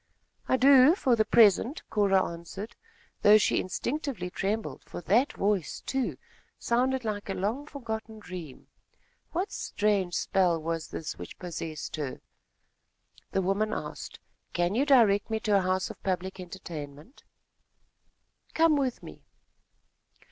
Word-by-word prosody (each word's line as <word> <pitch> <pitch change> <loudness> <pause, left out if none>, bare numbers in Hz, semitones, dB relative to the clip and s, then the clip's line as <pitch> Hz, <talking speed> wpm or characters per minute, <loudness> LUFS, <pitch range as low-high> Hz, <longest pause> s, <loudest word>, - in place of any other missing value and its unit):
"I 260 - +3
do, 275 +4 +7
for 255 -10 +2
the 220 - +3
present," 230 - +4
Cora 195 -3 +3
answered, 180 +7 -8 0.5
though 210 +1 +8
she 215 - +2
instinctively 235 - -3
trembled, 210 +4 -3
for - - -8
that 230 - +2
voice, 195 -7 -1
too, 265 -2 -2 0.4
sounded 255 +1 0
like 205 -2 -3
a 195 - -2
long 230 +10 -2
forgotten 220 -6 -6
dream. 180 -9 -9 0.7
What 365 +5 -2
strange 200 -4 0
spell 180 -3 +2
was 165 0 -3
this 155 - -6
which - - -9
possessed 165 -3 -6
her? 145 -4 -4 1.1
The 190 - 0
woman 205 +3 0
asked: - - -7 0.3
"Can 175 +2 +1
you 265 +6 +1
direct 225 -8 +5
me 220 0 -1
to 210 -2 +3
a - - +2
house 185 0 0
of - - -14
public 190 0 -3
entertainment?" 170 - -9 1.3
"Come 320 -2 +4
with 265 -3 -1
me." - - -11
205 Hz, 135 wpm, -28 LUFS, 180-240 Hz, 1.3 s, though